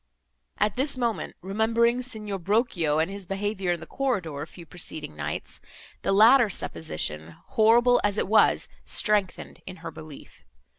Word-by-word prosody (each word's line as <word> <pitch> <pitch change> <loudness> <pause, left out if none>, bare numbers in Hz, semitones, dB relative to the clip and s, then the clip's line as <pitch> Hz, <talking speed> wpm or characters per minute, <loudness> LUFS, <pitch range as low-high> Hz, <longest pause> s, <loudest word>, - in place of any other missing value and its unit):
At 210 +1 0
this 270 +1 0
moment, 235 -5 -2
remembering 230 +5 +1
Signor 210 -5 -4
Brochio 180 -5 +1
and 160 +4 0
his 200 -2 -6
behaviour 195 -1 -2
in 170 - -5
the - - -8
corridor, 190 - -2
a 150 - -5
few 170 0 -13
preceding 160 - -3
nights, - - -5 0.4
the - - 0
latter 225 +4 +6
supposition, 80 - -4
horrible 240 0 +4
as 205 0 +1
it - - 0
was, 215 +2 +4 0.2
strengthened 210 -3 0
in 185 - -7
her 165 - -4
belief. 155 -2 -13
200 Hz, 150 wpm, -26 LUFS, 170-230 Hz, 0.4 s, latter